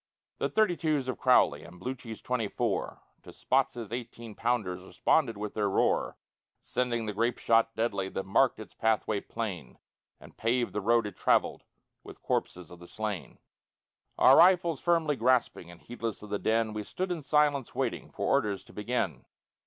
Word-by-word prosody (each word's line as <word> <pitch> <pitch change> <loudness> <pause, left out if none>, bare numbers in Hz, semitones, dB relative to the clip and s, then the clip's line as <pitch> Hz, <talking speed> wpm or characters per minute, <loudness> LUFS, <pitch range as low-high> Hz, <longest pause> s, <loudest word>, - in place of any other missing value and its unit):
The - - 0
thirty 215 -5 +2
twos 155 -6 -1
of 130 - -3
Crowley - - +4
And 90 +1 -13
Bluchi's 125 -3 -6
twenty 125 -4 -1
four - - -2 0.2
To - - -12
Spotts's 115 -2 -1
eighteen 120 -2 -7
pounders 105 -6 -1
Responded 115 +5 +1
with 105 0 -5
their 105 -2 0
roar, - - +1 0.4
Sending 120 -2 -2
the 105 - -3
grape 115 +4 0
shot 115 0 +2
deadly 100 -4 -1
That 95 - -4
marked 125 +7 +2
its 110 - -10
pathway 110 -2 0
plain, 100 - -6 0.4
And - - -15
paved 120 -3 0
the 105 - -2
road 115 +2 +3
it 105 - -6
travelled - - +1 0.4
With - - -13
corpses 90 -1 -2
of 90 - -12
the 85 - -12
slain. 105 -4 -5 0.8
Our 130 - +7
rifles 170 -4 +4
firmly 165 -4 +1
grasping, 120 -7 +1
And 85 -1 -13
heedless 115 -3 -6
of 105 - -10
the 105 - -1
din, 110 -1 +1
We 105 - -3
stood 185 - -4
in 170 -3 -3
silence 145 -2 +1
waiting - - -2
For - - -4
orders 100 -2 +1
to - - -17
begin. 105 - -2
115 Hz, 170 wpm, -29 LUFS, 105-125 Hz, 0.8 s, Our